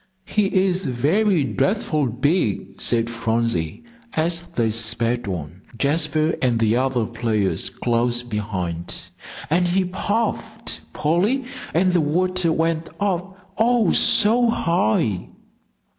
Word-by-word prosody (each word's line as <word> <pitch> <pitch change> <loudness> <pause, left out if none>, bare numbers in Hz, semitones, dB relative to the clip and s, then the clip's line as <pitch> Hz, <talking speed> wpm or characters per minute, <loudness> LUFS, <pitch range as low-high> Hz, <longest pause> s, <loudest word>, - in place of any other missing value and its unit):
"He 210 -2 +1 0.2
is 185 0 0
very 160 - +2
dreadful 150 - 0
big," 120 - -1
said 115 -1 +2
Phronsie, 115 - -1 0.3
as 165 +2 0
they 115 -2 +1
sped 115 +1 0
on, 90 -1 -5 0.2
Jasper 155 +3 +1
and 125 -3 +2
the 115 0 +2
other 130 -3 +1
players 110 -4 -1
close 120 0 0
behind. 95 -7 -4 0.5
"And 175 +2 +3
he 185 +2 +1
puffed, 205 +5 -3
Polly, 195 - +1 0.3
and 185 +3 +2
the 175 - +3
water 180 +3 +1
went 165 0 0
up, 190 -1 -3
oh, 230 -3 +3
so 230 +3 +4
high!" 110 - +1
145 Hz, 115 wpm, -22 LUFS, 115-185 Hz, 0.5 s, so